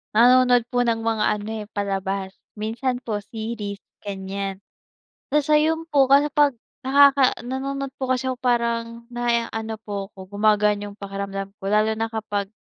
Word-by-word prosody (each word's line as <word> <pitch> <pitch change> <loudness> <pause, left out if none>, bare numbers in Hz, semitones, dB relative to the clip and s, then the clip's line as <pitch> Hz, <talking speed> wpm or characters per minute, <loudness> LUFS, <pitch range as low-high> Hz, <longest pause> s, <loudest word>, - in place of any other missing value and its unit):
nanonood 245 +1 +6
po 245 - +2
ng 235 -1 +2
mga 225 -1 0
ano, 205 +1 -7 0.2
eh, - - -22
palabas, 195 -1 -2 0.3
minsan 230 +4 -2
po 210 -3 -2
series, 215 -2 -5 0.2
ganiyan. 195 -1 -4 0.8
Tas 300 0 +2
ayun 320 +2 +3
po, 280 -2 +5
kasi, 280 +2 +5
pag 290 -1 +4 0.3
nakaka 280 -1 +6
nanonood 275 +2 -3
po 265 - -2
kasi, 255 +1 -1 0.2
parang 235 -1 0
naa-ano 235 -2 -1
po 200 -2 -5
ako, 190 -1 -12
gumagaan 210 -1 +3
yung 200 - -14
pakiramdam 195 0 -4
ko, - - -13
lalo 215 +1 +3
na 225 - 0
kapag 205 -3 -3
225 Hz, 145 wpm, -23 LUFS, 205-255 Hz, 0.8 s, nanonood